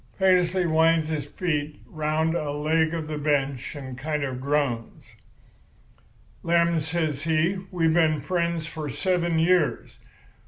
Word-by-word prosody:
"Paisley 185 Hz, -1 st, +3 dB
winds 160 Hz, 0 st, +3 dB
his 150 Hz, -3 st, -3 dB
feet 150 Hz, -3 st, -3 dB
round 155 Hz, +1 st, -1 dB
a 150 Hz, -4 st, -2 dB
leg 155 Hz, +2 st, +1 dB
of 165 Hz, -2 st, -3 dB
the 155 Hz, -1 st, -4 dB
bench 140 Hz, -2 st, -1 dB
and 130 Hz, -3 st, -7 dB
kind 150 Hz, +1 st, -2 dB
of 130 Hz, -2 st, -4 dB
groans. 140 Hz, -5 st, -1 dB, 1.4 s
"'Lem,' 170 Hz, 0 st, +2 dB
says 155 Hz, -2 st, -2 dB
he, 165 Hz, +4 st, +1 dB
'we 170 Hz, -3 st, +1 dB
been 160 Hz, -2 st, +3 dB
friends 170 Hz, +2 st, -1 dB
for 155 Hz, -1 st, -6 dB
seven 175 Hz, +1 st, 0 dB
years. 170 Hz, -1 st, +1 dB
160 Hz, 130 wpm, -25 LUFS, 150-170 Hz, 1.4 s, Paisley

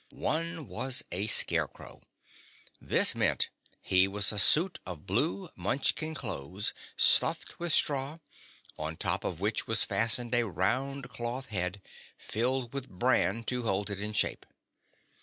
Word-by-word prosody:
One 165 Hz, -1 st, -3 dB
was 135 Hz, +3 st, 0 dB
a 100 Hz, +4 st, -1 dB
Scarecrow. -, -, +2 dB, 0.8 s
That -, -, +4 dB
means -, -, +1 dB, 0.3 s
he 95 Hz, +1 st, +2 dB
was 100 Hz, +1 st, +1 dB
a 105 Hz, -, -1 dB
suit 165 Hz, -, +4 dB
of 90 Hz, -5 st, -9 dB
blue 95 Hz, +2 st, -2 dB
Munchkin 140 Hz, -, -1 dB
clothes, 95 Hz, -, -4 dB, 0.2 s
stuffed -, -, +4 dB
with 170 Hz, -1 st, -2 dB
straw, 140 Hz, +1 st, +1 dB, 0.6 s
on 80 Hz, +1 st, -5 dB
top -, -, -1 dB
of 85 Hz, -, -4 dB
which 105 Hz, +3 st, -1 dB
was 115 Hz, 0 st, +2 dB
fastened 115 Hz, +1 st, +2 dB
a 120 Hz, -1 st, +2 dB
round 130 Hz, -, -2 dB
cloth 120 Hz, +3 st, -5 dB
head, 95 Hz, -1 st, -3 dB, 0.3 s
filled 125 Hz, +2 st, -3 dB
with 135 Hz, -1 st, -6 dB
bran 115 Hz, +1 st, 0 dB
to 125 Hz, +2 st, -2 dB
hold 100 Hz, -2 st, -2 dB
it 100 Hz, 0 st, -5 dB
in 105 Hz, +1 st, -3 dB
shape. 105 Hz, -, -2 dB
115 Hz, 140 wpm, -29 LUFS, 95-135 Hz, 0.8 s, That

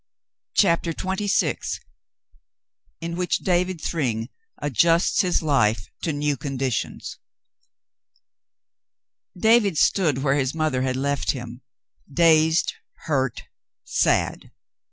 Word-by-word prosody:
CHAPTER 170 Hz, -3 st, +3 dB
XXVI 190 Hz, +4 st, -1 dB, 1.2 s
IN 170 Hz, 0 st, -4 dB
WHICH 180 Hz, 0 st, -1 dB
DAVID 180 Hz, -1 st, +1 dB
THRYNG 120 Hz, -8 st, -2 dB, 0.3 s
ADJUSTS 165 Hz, -, +2 dB
HIS 180 Hz, -3 st, +1 dB
LIFE 110 Hz, -10 st, +1 dB
TO 165 Hz, -, -1 dB
NEW 145 Hz, -1 st, -1 dB
CONDITIONS 135 Hz, -4 st, -3 dB, 2.2 s
David 215 Hz, -3 st, +4 dB
stood 150 Hz, -9 st, +2 dB
where 140 Hz, 0 st, +2 dB
his 135 Hz, +1 st, -1 dB
mother 155 Hz, -5 st, 0 dB
had 130 Hz, 0 st, -1 dB
left 140 Hz, +2 st, 0 dB
him, 120 Hz, -1 st, -8 dB, 0.5 s
dazed, 160 Hz, +1 st, +4 dB, 0.3 s
hurt, 135 Hz, -6 st, -1 dB, 0.4 s
sad. -, -, 0 dB
155 Hz, 90 wpm, -23 LUFS, 130-170 Hz, 2.2 s, David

